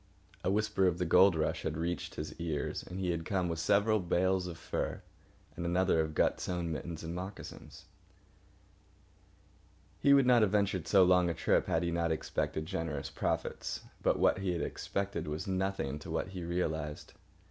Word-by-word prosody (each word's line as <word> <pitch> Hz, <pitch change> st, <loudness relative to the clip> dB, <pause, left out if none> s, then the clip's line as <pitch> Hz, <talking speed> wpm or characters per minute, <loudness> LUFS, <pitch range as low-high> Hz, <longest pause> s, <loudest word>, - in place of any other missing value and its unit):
A -, -, +1 dB
whisper 105 Hz, -1 st, +2 dB
of 85 Hz, -2 st, +1 dB
the 90 Hz, -, -1 dB
gold 90 Hz, +2 st, +6 dB
rush 80 Hz, -, 0 dB
had 75 Hz, -, -3 dB
reached 85 Hz, +2 st, -3 dB
his 75 Hz, -, -5 dB
ears, 80 Hz, -4 st, -2 dB
and 90 Hz, -, -7 dB
he 90 Hz, -2 st, 0 dB
had 85 Hz, -1 st, -2 dB
come 95 Hz, -1 st, 0 dB
with 85 Hz, -1 st, -3 dB
several 105 Hz, +4 st, +3 dB
bales 90 Hz, +1 st, +1 dB
of 85 Hz, -2 st, -7 dB
furs, 80 Hz, -, -3 dB, 0.5 s
and 85 Hz, -, -5 dB
another 90 Hz, 0 st, +2 dB
of 80 Hz, -1 st, -3 dB
gut -, -, +2 dB
sewn 85 Hz, -2 st, -2 dB
mittens 80 Hz, +1 st, -5 dB
and 80 Hz, +1 st, -4 dB
moccasins. 95 Hz, +3 st, -8 dB, 2.1 s
He 140 Hz, 0 st, +6 dB
would 135 Hz, -2 st, +5 dB
not 125 Hz, -2 st, +6 dB
have 105 Hz, -, +4 dB
ventured 100 Hz, -4 st, 0 dB
so 95 Hz, -2 st, +6 dB
long 90 Hz, -1 st, +4 dB
a 85 Hz, -, -2 dB
trip -, -, +2 dB
had 80 Hz, -, +1 dB
he 85 Hz, -, 0 dB
not 85 Hz, -1 st, 0 dB
expected 80 Hz, 0 st, -2 dB
generous 80 Hz, -5 st, -3 dB
profits. -, -, -2 dB, 0.2 s
But -, -, +2 dB
what -, -, +3 dB
he 95 Hz, -2 st, -1 dB
had 85 Hz, -, -2 dB
expected 100 Hz, -4 st, -3 dB
was 75 Hz, +5 st, -3 dB
nothing 95 Hz, -7 st, -1 dB
to -, -, -10 dB
what -, -, -2 dB
he 95 Hz, -2 st, -6 dB
realised. 80 Hz, -3 st, -3 dB
90 Hz, 180 wpm, -32 LUFS, 80-95 Hz, 2.1 s, gold